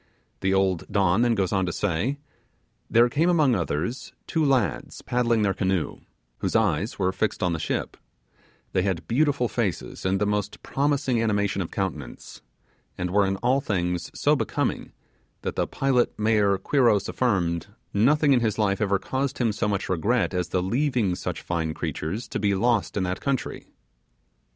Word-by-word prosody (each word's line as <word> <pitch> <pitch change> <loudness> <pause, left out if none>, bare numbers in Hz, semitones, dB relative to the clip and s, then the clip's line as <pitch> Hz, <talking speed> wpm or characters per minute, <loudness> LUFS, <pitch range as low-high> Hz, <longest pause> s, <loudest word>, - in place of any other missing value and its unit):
The 95 - 0
old 95 -3 +1
Don 95 +1 +3
then 120 -1 +3
goes 95 -3 0
on 95 -2 +1
to - - -1
say, 105 - -1 0.7
'There 120 +1 +5
came, 155 +8 +1
among 155 -7 +4
others, 90 - -2
two 160 -2 0
lads 135 -7 0
paddling 120 -3 +1
their 100 -2 +2
canoe, 95 -4 -1 0.4
whose - - -2
eyes 105 +5 +1
were 95 -1 +1
fixed 95 +1 -1
on 90 -2 +1
the 80 - -2
ship; - - -2 0.8
they 95 - +2
had 95 -3 -2
beautiful 140 0 +2
faces 110 -8 -3
and 95 +1 +1
the 105 - +1
most 105 -1 -2
promising 140 -4 0
animation 100 -3 0
of 85 - -4
countenance; 95 -2 -5 0.6
and 90 0 -2
were 100 0 +3
in 95 - 0
all 130 +3 +3
things 90 -5 -1
so - - +4
becoming, - - -2 0.5
that - - -3
the - - 0
pilot 130 -3 +1
mayor 105 -2 +3
Quiros 115 -1 +2
affirmed, 90 -9 0 0.3
nothing 140 +7 +4
in 125 - +4
his 110 -3 0
life 100 -1 +1
ever 100 -2 +2
caused 135 +6 -2
him 120 -3 +1
so 105 - -1
much 100 -2 -1
regret 100 +7 +1
as 90 -1 -1
the 90 +1 -1
leaving 120 -2 +1
such - - -4
fine 80 -2 -2
creatures 95 +10 -4
to - - -3
be 100 -2 +1
lost 115 +2 +1
in 95 - +1
that 90 0 -3
country. 140 -3 -2
105 Hz, 170 wpm, -25 LUFS, 95-125 Hz, 0.8 s, There